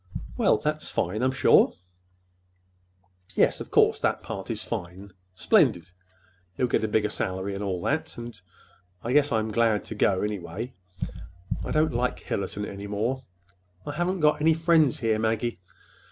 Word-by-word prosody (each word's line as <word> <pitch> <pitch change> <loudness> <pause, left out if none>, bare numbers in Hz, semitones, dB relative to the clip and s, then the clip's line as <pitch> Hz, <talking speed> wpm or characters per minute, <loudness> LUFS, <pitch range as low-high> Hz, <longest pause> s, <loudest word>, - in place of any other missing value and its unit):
"Well, - - +3
that's - - -2
fine, 105 +6 -1
I'm 130 - +3
sure." 130 - +5 1.6
"Yes, - - +3
of - - -7
course - - +4
that - - 0
part 100 -1 -6
is 110 -2 -2
fine—splendid. 90 -3 0 0.7
He'll 125 - +2
get 120 - +1
a - - +1
bigger 105 0 +1
salary, 95 +1 -2
and 100 +1 -4
all 95 -3 -2
that, 155 +2 -1
and—and 120 -3 -8 0.6
I 120 - -1
guess 145 0 +4
I'm 110 -1 0
glad 110 -1 +2
to - - -6
go, 100 -3 +2
anyway—I 90 -3 -6
don't 155 -1 +2
like 125 +1 -1
Hillerton 100 +1 -3
any 100 +1 -7
more. 115 +6 -2 0.6
I - - -3
haven't 175 +3 -1
got 150 0 +3
any 160 +1 +4
friends 160 -5 +3
here, 110 -2 +1
Maggie. 110 0 -1
110 Hz, 150 wpm, -26 LUFS, 95-125 Hz, 1.6 s, sure